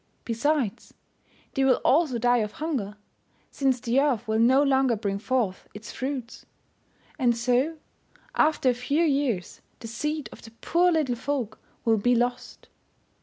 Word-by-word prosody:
Besides, 240 -1 -1 0.6
they 270 - +1
will 265 -1 +4
also 285 -3 +3
die 245 +1 +3
of 210 -1 -2
hunger, 265 -11 -3 0.5
since 265 -3 +1
the 240 +3 +1
earth 250 -6 0
will 220 0 +1
no 260 +5 +5
longer 265 -3 +3
bring 200 -2 -3
forth 225 -5 -1
its 210 +2 -9
fruits. 260 -3 -5 0.8
And 240 -3 +2
so, 250 +7 +1 0.6
after 305 -4 +3
a - - -1
few 280 +7 0
years, 275 - -1 0.2
the 230 - -9
seed 300 +4 -3
of - - -13
the 225 - -12
poor 355 +1 +2
little 305 -7 +1
folk 255 -3 -3 0.3
will 225 -1 +3
be 245 +4 +2
lost. 245 +1 -2
250 Hz, 150 wpm, -26 LUFS, 230-285 Hz, 0.8 s, no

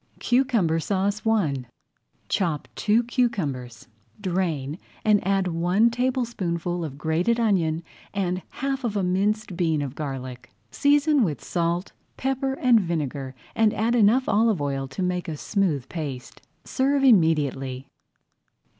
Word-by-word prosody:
CUCUMBER 240 - +2
SAUCE 200 +5 -1
I 155 - +1 0.6
Chop 165 -6 -1
two 220 +3 +2
cucumbers, 160 - -2 0.3
drain, 175 -6 -2 0.3
and 210 -1 +4
add 195 -2 +2
one 180 +7 +2
tablespoonful 225 -9 -1
of 140 -4 -6
grated 165 +10 +1
onion 170 -8 +1 0.3
and 185 -2 -1
half 270 0 -3
of 215 -4 -1
a 195 - 0
minced 195 +2 0
bean 165 -4 +1
of 135 -3 -5
garlic. 130 -4 -6 0.2
Season 290 -1 +3
with 150 - -2
salt, 170 +1 -1 0.3
pepper, 270 0 -1
and 250 -3 +4
vinegar, 145 -6 -3 0.2
and 220 -1 +2
add 225 +2 +1
enough 240 +3 +4
olive 220 -3 +3
oil 135 -1 -2
to 130 +8 -4
make 180 0 -1
a 155 -2 -4
smooth 160 - 0
paste. 140 -7 -6 0.2
Serve 275 +1 +1
immediately. 145 - +2
185 Hz, 130 wpm, -25 LUFS, 155-225 Hz, 0.6 s, and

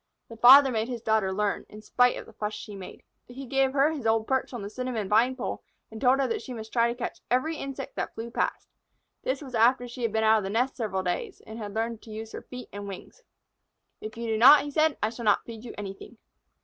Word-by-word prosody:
The 230 - -9
father 265 +3 +8
made 220 -1 -1
his 240 -3 -5
daughter 220 -4 +1
learn, 205 +1 -1
in 215 0 -12
spite 245 +2 +3
of - - -8
the - - -16
fuss 210 0 -4
she 210 0 -8
made. 190 -2 -10 0.2
He 265 +2 -9
gave 270 +1 +1
her 285 +2 +3
his 280 -8 -3
old 225 0 +2
perch 265 +1 -1
on 240 -5 -6
the 200 - -5
cinnamon 245 -4 -3
vine 230 +6 +3
pole, 250 - -4 0.3
and 220 - -9
told 260 +1 +4
her 275 - +2
that 445 -2 -2
she 255 - -7
must 220 -1 -9
try 235 -1 +3
to 235 - -2
catch 245 - -5
every 305 +6 +1
insect 275 -1 -6
that - - -3
flew 230 +1 -6
past. - - -2 0.5
This 265 +3 -2
was 260 -3 -10
after 245 +2 +3
she 245 +1 -9
had 230 -2 0
been 220 +1 0
out 220 0 +5
of - - -5
the 195 - -3
nest 245 +6 0
several 195 -6 -2
days, 180 -1 -3
and 220 +1 -9
had 205 -2 -7
learned 225 0 -2
to - - -14
use 220 +1 -7
her - - -7
feet 250 0 -10
and 205 0 -6
wings. 200 - -10 0.8
"If 215 +1 -8
you 235 - -4
do 220 -1 -1
not," 275 +4 +9
he 290 - -6
said, 310 0 +2
"I 215 - +1
shall 235 0 -7
not 210 - +3
feed 225 -1 -9
you 235 - -8
anything." 200 +3 -8
230 Hz, 255 wpm, -27 LUFS, 215-255 Hz, 0.8 s, not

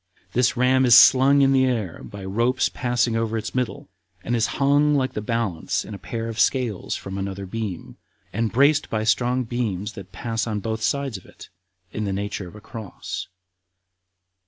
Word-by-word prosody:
This 125 +2 +2
ram 130 +1 +4
is 125 -2 +8
slung 135 +2 +7
in 135 - +4
the 130 -1 +4
air 110 -9 -2
by 100 -2 -9
ropes 115 +6 +1
passing 120 -2 0
over 115 0 -1
its 110 0 -5
middle, 125 -2 -2 0.4
and 120 - -1
is 115 -1 +2
hung 145 +2 +3
like 130 -2 0
the 105 - -3
balance 105 -7 -2
in 110 - -8
a 100 - -7
pair 115 -1 -5
of 115 0 -5
scales 120 -8 0
from 95 0 -6
another 95 0 -4
beam, 100 -3 -5 0.4
and 115 +2 -1
braced 140 +4 +3
by 110 -1 -1
strong 125 +3 +1
beams 110 -4 -3
that 95 -2 -10
pass 115 +4 -3
on 105 -2 -2
both 110 +2 -3
sides 140 -2 -1
of 90 - -15
it, - - -14 0.4
in 105 - -3
the 100 - -2
nature 100 -1 -4
of 90 - -13
a 105 - -11
cross. 110 -2 -7
115 Hz, 185 wpm, -23 LUFS, 105-125 Hz, 0.4 s, is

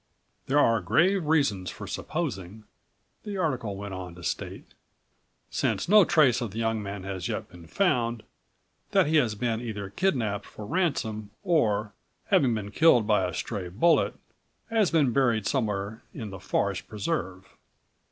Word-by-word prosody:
"There 135 - +2
are 115 -6 +4
grave 160 - +2
reasons 140 - +1
for - - -8
supposing," 110 - -4 0.6
the 205 -2 -5
article 125 - -1
went 100 0 -6
on 90 -2 -7
to 85 - -12
state, - - -5 0.8
"since - - 0
no 210 0 +7
trace 135 -8 +4
of 120 - -2
the 100 - -9
young 110 -1 0
man 100 -1 -6
has 95 -2 -4
yet - - -4
been 85 -1 -14
found, 120 - 0 0.7
that - - +5
he 155 +2 +3
has 115 -7 +2
been 115 +1 -1
either 105 -5 -5
kidnapped 110 - -1
for 105 - -9
ransom 110 - -1
or, 110 - +1 0.4
having 140 - +4
been 105 -2 -5
killed 125 -3 +5
by 105 -3 +3
a 90 - -5
stray 100 -6 -4
bullet, 145 - +3 0.6
has 220 -5 +3
been 145 -7 +2
buried 120 -6 +2
somewhere 105 -5 -1
in 110 -4 -6
the 95 - -8
forest - - -1
preserve. 95 - -4
110 Hz, 155 wpm, -27 LUFS, 100-150 Hz, 0.8 s, no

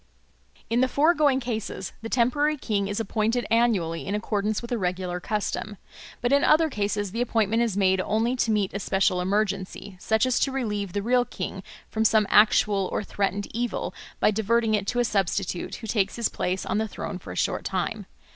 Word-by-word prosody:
In 235 +2 +1
the 260 - +4
foregoing 290 -1 +3
cases 220 -6 -4
the 225 - -6
temporary 290 +6 +2
king 205 -6 -1
is 205 +2 -2
appointed 225 +2 0
annually 205 -9 +1
in 200 - -1
accordance 210 0 -1
with 235 - -8
a 240 - +1
regular 180 -1 -2
custom. 210 +1 -3 0.4
But 245 +2 +1
in 280 - +4
other 315 0 +4
cases 205 -2 -1
the 230 +4 -2
appointment 225 -2 +1
is 225 -5 0
made 190 -1 +3
only 225 +6 0
to 235 - +1
meet 210 -3 +1
a 200 - -2
special 185 -2 +1
emergency, 195 0 -2
such 220 +4 +2
as 255 -1 +1
to 275 - +1
relieve 210 -8 -2
the 205 - -2
real 245 +2 +3
king 215 -5 -6 0.3
from 220 - -1
some 215 0 +4
actual 205 -2 +4
or - - -1
threatened 200 0 -2
evil 240 +2 -2 0.3
by - - +4
diverting 220 +1 +1
it 205 -2 0
to - - -1
a 245 - +3
substitute, 195 -3 -1
who 230 - -9
takes 200 -3 0
his 235 -2 0
place 185 +1 -2
on 210 - 0
the 220 - -1
throne 195 -2 -6
for 95 - -9
a - - -7
short - - -1
time. - - -3
215 Hz, 195 wpm, -25 LUFS, 195-235 Hz, 0.4 s, the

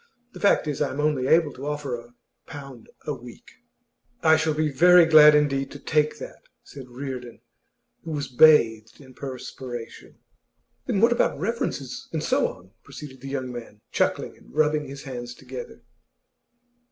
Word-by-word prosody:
The - - -10
fact 200 - +3
is, 150 -2 -3
I 145 - +1
am 140 - -6
only 150 -4 0
able 160 0 +3
to 135 +3 -8
offer 145 -3 -3
a 120 0 -8 0.3
pound 135 -6 -11 0.2
a - - -2
week.' - - -13 0.7
'I 160 -1 +6
shall 160 -1 0
be 155 -1 0
very 175 +5 +6
glad 150 -2 +8
indeed 140 -2 +1
to 145 - -9
take 150 +2 0
that,' - - -10 0.2
said 130 -3 -12
Reardon, 125 -2 -7 0.6
who 165 - -8
was 145 -2 -3
bathed 115 -6 +4
in 130 -2 -15
perspiration. 125 -2 -8 0.7
'Then 195 - 0
what 230 +1 +5
about 240 - +1
references, 175 - -4
and - - -3
so - - +2
on?' 95 +2 -12
proceeded 140 -1 -11
the 135 - -7
young 130 -2 -4
man, 120 -3 -9
chuckling - - -1
and - - -20
rubbing 150 -1 +1
his 135 0 -9
hands 120 -2 -7
together. 480 0 -10
140 Hz, 165 wpm, -24 LUFS, 130-155 Hz, 0.7 s, glad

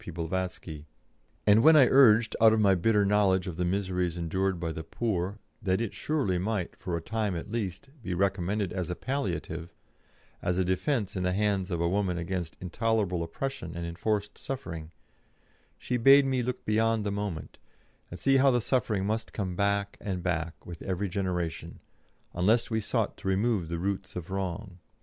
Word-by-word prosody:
P. - - -8
Blavatsky, 85 -2 -4 0.6
and 105 +1 +6
when 160 +4 +7
I 145 -4 +8
urged, 115 -4 +5
out 110 -1 +7
of 110 - +2
my 100 -2 +5
bitter 105 +3 +3
knowledge 100 -2 +3
of 90 -4 -5
the 90 - 0
miseries 90 -2 -1
endured 95 +2 -1
by 85 -1 -2
the 80 0 -6
poor, 95 +1 -2 0.2
that 95 -3 +1
it 115 -3 -2
surely 135 - 0
might, 95 -1 -2
for 90 -3 -3
a - - -5
time 110 -1 -1
at 85 +5 -6
least, 115 +2 -4
be 90 -5 -3
recommended 95 +1 0
as 90 -2 -3
a 90 - -2
palliative, 85 - -3 0.7
as 90 0 0
a 95 - +2
defence 100 +4 0
in 95 - -1
the 90 0 +1
hands 100 -2 0
of 85 -3 -2
a 85 - +1
woman 95 -1 0
against 85 -1 -4
intolerable 100 -1 0
oppression 85 0 -4
and 85 - -3
enforced 100 +5 -2
suffering, 85 -13 -6 0.9
she 125 - -2
bade 135 +4 +7
me 130 -2 +1
look 125 +1 -4
beyond 110 0 +2
the 100 - 0
moment, 100 -6 -4 0.5
and 90 - -8
see 135 0 +4
how 135 +1 +5
the 125 -2 +3
suffering 110 -5 0
must 110 +2 -2
come 95 -4 -3
back 100 +1 0
and 95 -3 -3
back 85 -2 -2
with 85 -2 -9
every 95 +1 -2
generation, 90 -3 -3 0.5
unless 105 +8 +2
we 110 - +1
sought 105 - -1
to - - -7
remove 95 -2 +1
the 85 - -2
roots 100 +2 -3
of 90 0 -6
wrong. 95 0 -4
95 Hz, 180 wpm, -29 LUFS, 90-110 Hz, 0.9 s, I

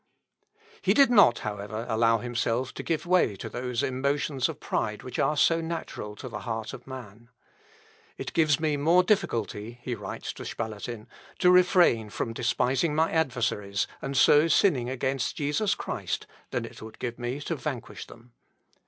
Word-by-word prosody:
He - - +2
did 275 -3 +6
not, 200 - +6
however, 105 +2 -4
allow 115 0 +3
himself 120 +2 -1
to - - -6
give 165 -1 -2
way 175 - +3
to - - -7
those 125 -1 -3
emotions 140 0 0
of - - -6
pride 105 0 -2
which 125 - -6
are 150 - +2
so 165 +3 +4
natural 160 -10 -5
to 130 - -8
the 110 -4 -6
heart 110 -2 -4
of - - -10
man. 120 -3 -10 0.9
"It - - -6
gives 155 -3 +3
me 155 -2 0
more 165 +5 +4
difficulty," 115 - -1
he 125 - -3
writes 105 -4 -6
to - - -9
Spalatin, 110 +1 -5 0.3
"to 180 - +5
refrain 180 - +4
from 115 +2 -3
despising 135 +7 +1
my 160 +1 +2
adversaries, 120 -10 0 0.2
and 135 0 -3
so 150 +5 +6
sinning 145 - +3
against 130 0 -1
Jesus 155 +7 0
Christ, - - -4 0.2
than - - -2
it - - -11
would 110 0 -10
give 120 -1 -5
me 120 +3 -3
to 165 - -2
vanquish 140 -5 -6
them. 120 +1 -16
125 Hz, 165 wpm, -27 LUFS, 115-155 Hz, 0.9 s, did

